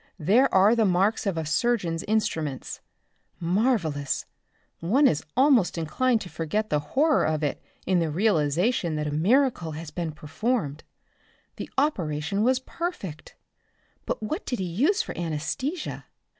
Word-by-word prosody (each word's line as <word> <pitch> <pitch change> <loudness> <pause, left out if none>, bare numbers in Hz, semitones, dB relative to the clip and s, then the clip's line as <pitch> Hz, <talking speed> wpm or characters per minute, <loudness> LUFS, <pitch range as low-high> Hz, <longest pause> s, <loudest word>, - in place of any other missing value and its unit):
"There 210 - +3
are 200 +4 +5
the 230 - +3
marks 200 +3 +2
of 190 -4 -1
a 160 - -2
surgeon's 170 0 0
instruments. 160 -10 -2 0.6
Marvelous. 170 - 0 0.5
One 235 - +3
is 150 - +3
almost 260 -10 +4
inclined 220 +9 +1
to - - -6
forget 205 +8 -2
the 150 - +3
horror 275 - +2
of 155 -1 0
it 145 - -2 0.2
in 185 -2 +2
the 165 -2 0
realization 170 - +1
that 150 0 -2
a 150 - -2
miracle 180 - +2
has 155 0 -7
been 170 -3 -3
performed. 155 - -2 0.7
The - - -6
operation 195 - 0
was 255 +3 +3
perfect. 260 - -6 0.7
But - - -3
what 310 - -3
did 245 - -1
he 190 - -2
use 260 - +1
for - - -7
anesthesia? 175 - -3
185 Hz, 145 wpm, -26 LUFS, 155-245 Hz, 0.7 s, are